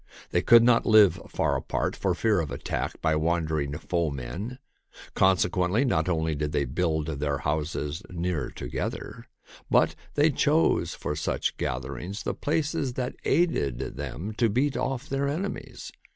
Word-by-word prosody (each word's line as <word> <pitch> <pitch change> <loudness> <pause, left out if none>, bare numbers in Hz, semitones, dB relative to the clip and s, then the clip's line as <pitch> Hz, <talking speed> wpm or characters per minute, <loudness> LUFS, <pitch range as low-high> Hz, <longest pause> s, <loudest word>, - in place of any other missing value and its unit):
They - - +2
could 115 0 +7
not 120 -1 +4
live 100 -6 +6
far - - 0
apart - - -2
for 95 -3 0
fear 110 0 +2
of 80 -3 -2
attack - - -3
by 80 - +3
wandering 80 -3 0
foemen. 85 - -3 0.6
Consequently, 95 +4 +2
not 90 -8 +1
only 80 -2 0
did 75 +1 -2
they 70 -2 +1
build 80 +3 0
their 70 -2 -2
homes 75 +2 -2
near 85 -7 -2
together, - - -5 0.4
but - - +4 0.2
they 150 +2 +4
chose 150 +4 +2
for 75 +1 -3
such 75 - -1
gatherings 70 - -4
the - - -1
places 145 -3 -1
that 125 0 -3
aided 115 - +2 0.2
them 100 +7 -5
to 115 -2 +4
beat 130 +6 +1
off 135 -2 -2
their 140 +1 -1
ene 180 +8 -1
mies. - - -9
90 Hz, 150 wpm, -27 LUFS, 75-120 Hz, 0.6 s, could